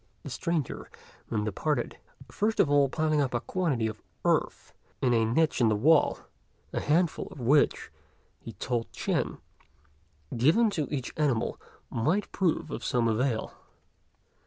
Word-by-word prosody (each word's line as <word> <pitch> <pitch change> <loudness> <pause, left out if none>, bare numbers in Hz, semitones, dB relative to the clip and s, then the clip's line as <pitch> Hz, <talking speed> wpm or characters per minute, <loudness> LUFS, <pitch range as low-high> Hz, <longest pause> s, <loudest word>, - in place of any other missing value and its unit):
The - - -7
stranger 170 -6 -2 0.4
then 105 -2 -1
departed, 120 +6 -2 0.3
first 220 +2 0
of 145 - +4
all 140 -1 +4
piling 155 0 +1
up 130 -3 -1
a - - +2
quantity 150 -8 -1
of 110 -1 -4 0.2
earth - - 0 0.3
in 125 -2 +2
a 115 -1 +3
niche 145 +5 +1
in 115 - +5
the 110 - +2
wall, 150 +9 +4 0.6
a - - 0
handful 165 +2 +1
of - - -11
which, 140 +5 +2 0.5
he 115 - -9
told 115 +4 -3
Ch'ên, - - -1 1.0
given 165 - +4
to 155 -7 -1
each 130 -4 -3
animal, 135 -7 0 0.3
might 160 - 0
prove 180 -4 0
of - - -5
some 120 -3 +1
avail. 115 +1 0
140 Hz, 145 wpm, -28 LUFS, 115-155 Hz, 1.0 s, in